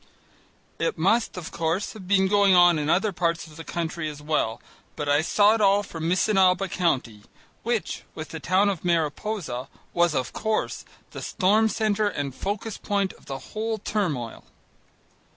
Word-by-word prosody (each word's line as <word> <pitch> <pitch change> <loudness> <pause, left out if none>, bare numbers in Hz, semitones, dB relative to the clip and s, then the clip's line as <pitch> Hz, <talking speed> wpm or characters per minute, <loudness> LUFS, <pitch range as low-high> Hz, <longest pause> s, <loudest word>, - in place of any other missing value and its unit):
It 485 - 0
must, 235 -4 +2
of 170 -3 -6
course, 165 +4 -1
have 190 -4 -11
been 190 0 +4
going 200 -1 +5
on 175 -2 +6
in 150 0 -2
other 200 +5 +2
parts 170 -2 -1
of 155 -2 -14
the 165 - -8
country 165 0 -3
as 150 -1 -9
well, 150 -7 -1 0.4
but 150 -2 -4
I 145 +1 +4
saw 205 +6 +4
it 225 - 0
all 200 0 +4
from 165 -4 -4
Missinaba 190 0 +3
County 130 - -1 0.4
which, 235 -2 -2
with 155 - -6
the 160 - -6
town 185 +6 +2
of 190 -5 -3
Mariposa, 165 - -1 0.3
was, 170 -3 +2
of 130 -1 -2
course, 220 0 -2 0.3
the - - -7
storm 215 +3 +2
centre 215 -1 +1
and 140 -7 -4
focus 205 - -4
point 200 -2 -1
of - - -21
the 135 - -4 0.2
whole 220 +1 -2
turmoil. 170 - -2
180 Hz, 170 wpm, -25 LUFS, 155-205 Hz, 0.4 s, on